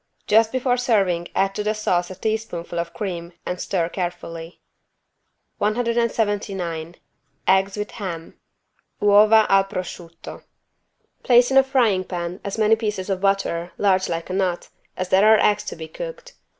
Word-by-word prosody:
Just 220 +1 +4
before 255 -1 +1
serving 195 -8 +1
add 195 0 +1
to 210 - -3
the 215 +1 0
sauce 180 -4 0
a 185 - -8
teaspoonful 190 -5 -3
of 170 0 -3
cream 175 -3 -5
and 180 - -4
stir 175 -4 -1
carefully. 175 -2 -6 1.0
179 205 -7 -1 0.5
EGGS 190 +1 +3
WITH 210 0 -4
HAM 170 -5 -6 0.7
(Uova 210 +2 +6
al 195 0 +4
prosciutto) 175 -3 -8 0.8
Place 245 0 +4
in 265 - +4
a 270 - +8
frying 240 -8 +2
pan 175 0 -5
as 200 +2 -4
many 220 0 +4
pieces 210 -3 -3
of 190 -1 -2
butter, 195 -3 0
large 190 -2 +2
like 165 +2 -4
a - - -3
nut, 185 -2 -1 0.3
as 185 0 -3
there 190 +2 +4
are - - +2
eggs 205 - +2
to - - -5
be 160 -1 -8
cooked. - - -8
195 Hz, 150 wpm, -22 LUFS, 175-220 Hz, 1.0 s, a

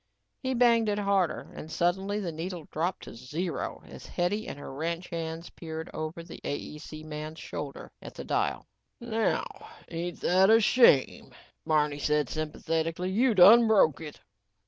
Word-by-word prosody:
He 260 -1 -1
banged 235 -2 +4
it 205 - 0
harder 200 -4 0
and 160 - -9
suddenly 190 +5 0
the 180 -5 -3
needle 165 +1 -6
dropped 175 +4 -2
to - - -9
zero 150 +9 -4
as - - -11
Hetty 195 +5 -1
and - - -6
her 145 - -8
ranch 165 +5 -3
hands 165 0 -5
peered 160 -1 -7
over 155 +2 -5
the 165 - -11
AEC 155 +2 -6
man's 155 +1 -6
shoulder 145 -3 -7
at - - -10
the - - -6
dial. - - -1 0.3
"Now 225 -2 0 0.4
ain't 170 +1 -4
that 190 +2 +4
a 225 +1 +7
shame," 225 - +4 0.3
Barney 150 -2 +2
said 150 -2 +1
sympathetically. 165 +3 -2
"You 230 +3 +2
done 220 +6 +8
broke 160 -11 +4
it." 150 -2 -8
170 Hz, 155 wpm, -28 LUFS, 155-200 Hz, 0.4 s, done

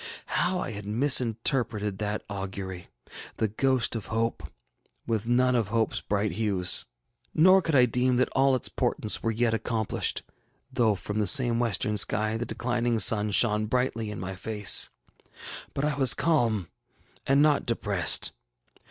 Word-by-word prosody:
How 180 +1 0
I 175 - -4
had 105 -1 -8
misinterpreted 115 -3 0
that 105 0 -3
augury, 95 -2 -7 0.5
the 110 - 0
ghost 125 +3 0
of 110 - -6
hope, 115 +1 -3 0.5
with 115 -1 -2
none 125 +1 +2
of 115 -5 0
hopeŌĆÖs 115 0 -1
bright 105 0 -1
hues! 95 -2 +2 0.5
Nor 185 +4 +5
could 165 -3 -2
I 125 -2 +6
deem 125 +1 0
that 130 +1 +2
all 135 0 +2
its 125 - -2
portents 105 - -1
were 115 - -1
yet 115 +1 0
accomplished, 110 -1 -2 0.5
though 110 -4 +2
from 105 +2 -5
the 105 - 0
same 120 +2 +3
western 105 -2 0
sky 110 +2 +1
the 120 +1 -4
declining 120 -1 -2
sun 105 -1 +4
shone 105 0 +2
brightly 115 -2 -2
in 105 - -7
my 95 +1 -6
face. 105 +1 +1 0.9
But 140 - -1
I 150 - +1
was 135 -3 +4
calm 115 - 0 0.6
and 140 +2 +4
not 150 -2 +2
depressed. 100 -6 +2
115 Hz, 150 wpm, -26 LUFS, 105-125 Hz, 0.9 s, I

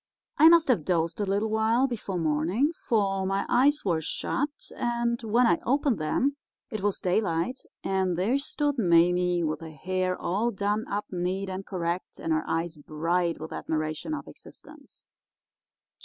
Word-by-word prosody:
"I 315 +2 +9
must 335 -1 +6
have 225 -11 +3
dozed 170 +2 0
a 205 - -1
little 205 +3 0
while 220 +4 +3
before 220 -7 -3
morning, 165 - +1
for 200 - 0
my 195 +1 0
eyes 285 +3 +3
were 170 -4 +1
shut, 285 - -1 0.3
and 235 0 -1
when 230 +2 +3
I 175 -6 +3
opened 275 - +1
them 270 - 0 0.3
it 215 - -4
was 205 0 0
daylight, 185 +4 0 0.2
and 190 -2 0
there 225 +10 +1
stood 290 -1 -1
Mame 175 -1 +3
with 155 +1 -2
her 165 - -7
hair 185 +4 -2
all 205 +7 0
done 205 +1 -1
up 205 +1 -2
neat 185 +2 -2
and 190 +1 -4
correct, 175 -1 -3
and 165 - -1
her 155 - +1
eyes 165 -1 -2
bright 165 +3 -1
with 160 - -7
admiration 155 - -3
of - - -8
existence. - - -14
190 Hz, 160 wpm, -27 LUFS, 170-235 Hz, 0.3 s, I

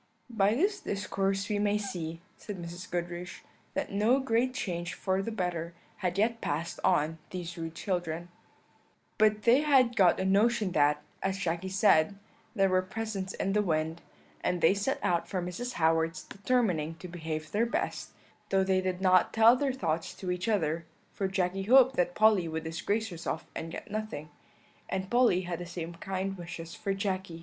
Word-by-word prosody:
"By 210 -1 +3
this 400 - +1
discourse 195 - -1
we 210 -1 0
may 205 0 +2
see," 170 -5 -5
said 205 -2 -7
Mrs. 175 +1 -8
Goodriche, 175 0 -4 0.3
"that - - -2
no 215 +7 +3
great 255 -1 +1
change 175 -8 -3
for 190 0 0
the 230 - -4
better 175 -5 -3 0.2
had 180 -1 -2
yet 230 +2 +1
passed 160 +4 -2
on 155 +2 +2
these 175 -2 -5
rude 165 -1 -6
children. 175 -3 -3 0.9
"But 215 0 +3
they 240 +3 +6
had 265 -5 +4
got 185 -5 +5
a 190 - 0
notion 210 +1 +3
that, 150 -2 +3 0.2
as 190 0 -1
Jacky 180 -1 -2
said, 190 -2 +4 0.4
there 195 -2 +4
were 185 -1 +3
presents 195 -1 -4
in 195 - -1
the 210 - +3
wind, 160 -3 -1 0.4
and 180 - 0
they 165 +3 +5
set 205 +7 -1
out 170 -1 +1
for 185 - -1
Mrs. 180 +8 -4
Howard's 160 -1 +1
determining 195 -8 0
to 180 - -9
behave 160 -3 -5
their 225 +3 +2
best, 325 +10 -2 0.4
though 195 0 +3
they 190 0 +2
did 185 0 -2
not 185 -1 +4
tell 225 +2 +7
their 275 +1 0
thoughts 165 -10 -2
to 185 -2 -4
each 180 +4 -2
other, 170 -6 +1 0.3
for 195 - -2
Jacky 190 0 -1
hoped 260 +5 +6
that 175 0 +1
Polly 215 -5 +4
would 160 0 -3
disgrace 200 +7 -1
herself 170 -2 -4
and 165 - -5
get 205 - -8
nothing, 210 -9 -4 0.6
and 190 0 -3
Polly 240 -7 +4
had 175 -2 -4
the 175 - -6
same 170 -1 -5
kind 190 +2 -4
wishes 165 -1 -7
for 200 -3 -2
Jacky. 190 -4 -3
190 Hz, 175 wpm, -30 LUFS, 170-210 Hz, 0.9 s, tell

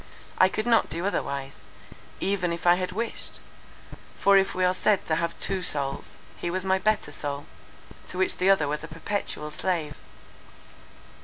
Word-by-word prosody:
I 185 - +7
could 215 - -2
not 235 -1 +4
do 170 +4 -2
otherwise, 140 - -2 0.6
even 190 -3 0
if 170 +1 -4
I 175 - +8
had 180 +1 -1
wished; 225 +5 -4 0.8
for 200 - +5
if 195 0 +3
we 185 0 +2
are 180 - +3
said 200 +1 +2
to 155 - +1
have 170 0 -2
two 195 -1 0
souls, 140 -5 -1 0.2
he 175 - -3
was 185 +2 -2
my 190 0 +2
better 215 -6 +1
soul, 145 -1 -4 0.6
to 180 - -5
which 185 - +2
the 185 +2 +3
other 190 -7 +4
was 150 +1 -2
a - - -6
perpetual 165 -2 -3
slave. 155 -3 -2
180 Hz, 170 wpm, -26 LUFS, 150-195 Hz, 0.8 s, I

